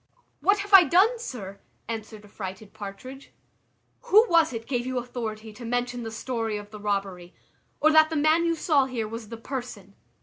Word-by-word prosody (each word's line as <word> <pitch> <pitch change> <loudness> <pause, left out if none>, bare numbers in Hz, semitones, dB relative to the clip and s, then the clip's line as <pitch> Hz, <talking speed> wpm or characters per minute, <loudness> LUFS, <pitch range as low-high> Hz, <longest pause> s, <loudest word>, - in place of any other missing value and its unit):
"What 400 +1 +3
have 405 0 -8
I 385 -2 +11
done, 410 +9 +3
sir?" 200 - -7 0.3
answered 220 -2 -7
affrighted 200 0 -8
Partridge. 220 +6 -9 0.7
"Who 440 -1 +6
was 330 -3 +4
it 225 -2 -6
gave 245 -2 -1
you 255 0 -2
authority 225 -3 -5
to 240 - -11
mention 245 +1 -2
the 225 - -5
story 225 -1 -3
of 205 0 -10
the 210 - -9
robbery, 195 -4 -3 0.4
or 310 +2 +4
that 315 0 +6
the 320 - -3
man 310 +3 +3
you 335 0 +1
saw 300 -4 +2
here 240 -4 -3
was 225 -1 -8
the 230 - -7
person?" 230 -5 -7
235 Hz, 180 wpm, -26 LUFS, 215-300 Hz, 0.7 s, I